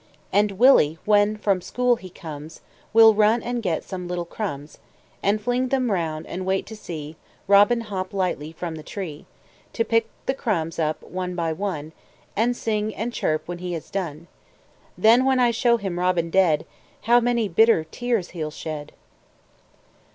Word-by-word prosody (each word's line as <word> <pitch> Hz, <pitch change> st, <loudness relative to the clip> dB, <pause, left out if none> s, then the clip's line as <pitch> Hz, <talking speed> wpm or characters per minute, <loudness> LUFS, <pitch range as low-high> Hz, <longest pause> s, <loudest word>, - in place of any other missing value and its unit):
And 205 Hz, +1 st, +3 dB
Willy, 195 Hz, -, +5 dB
when 210 Hz, 0 st, +3 dB
from 200 Hz, -3 st, +1 dB
school 245 Hz, +6 st, +1 dB
he 190 Hz, -5 st, -11 dB
comes, 155 Hz, -2 st, -9 dB, 0.3 s
Will 225 Hz, 0 st, +8 dB
run 215 Hz, +2 st, +3 dB
and 240 Hz, 0 st, -2 dB
get 175 Hz, -7 st, -1 dB
some 180 Hz, -2 st, -6 dB
little 175 Hz, -1 st, -3 dB
crumbs, 155 Hz, -7 st, -6 dB, 0.4 s
And 205 Hz, +2 st, +2 dB
fling 245 Hz, +4 st, 0 dB
them 255 Hz, -3 st, 0 dB
round, 160 Hz, -4 st, -2 dB
and 185 Hz, +2 st, -5 dB
wait 190 Hz, +1 st, 0 dB
to 220 Hz, -, -9 dB
see 155 Hz, -6 st, -8 dB, 0.3 s
Robin 205 Hz, +4 st, +5 dB
hop 190 Hz, -4 st, -5 dB
lightly 180 Hz, -6 st, -2 dB
from 165 Hz, +1 st, -5 dB
the 160 Hz, -, -7 dB
tree, 160 Hz, -2 st, -7 dB, 0.5 s
To 230 Hz, -, 0 dB
pick 230 Hz, -1 st, +1 dB, 0.2 s
the 265 Hz, -, +1 dB
crumbs 170 Hz, -, -2 dB
up, 155 Hz, -1 st, -1 dB
one 180 Hz, 0 st, -5 dB
by 165 Hz, -2 st, -1 dB
one, 160 Hz, -4 st, -4 dB, 0.4 s
And 240 Hz, +3 st, +1 dB
sing 215 Hz, -1 st, -2 dB
and 235 Hz, +3 st, -3 dB
chirp, 155 Hz, -7 st, -1 dB
when 175 Hz, 0 st, -5 dB
he 180 Hz, 0 st, -4 dB
has 165 Hz, -, -7 dB
done; 170 Hz, -5 st, -4 dB, 0.7 s
Then 230 Hz, +4 st, +5 dB
when 265 Hz, -1 st, +3 dB
I 245 Hz, -1 st, +4 dB
show 235 Hz, +1 st, +3 dB
him 190 Hz, -5 st, -4 dB
Robin 180 Hz, -2 st, +1 dB
dead, 165 Hz, -5 st, +3 dB, 0.4 s
How 240 Hz, +2 st, +5 dB
many 240 Hz, -2 st, +1 dB
bitter 210 Hz, -1 st, +4 dB
tears 230 Hz, +2 st, -2 dB
he'll 160 Hz, -3 st, -4 dB
shed! 150 Hz, -1 st, -7 dB
190 Hz, 170 wpm, -23 LUFS, 165-225 Hz, 0.7 s, Will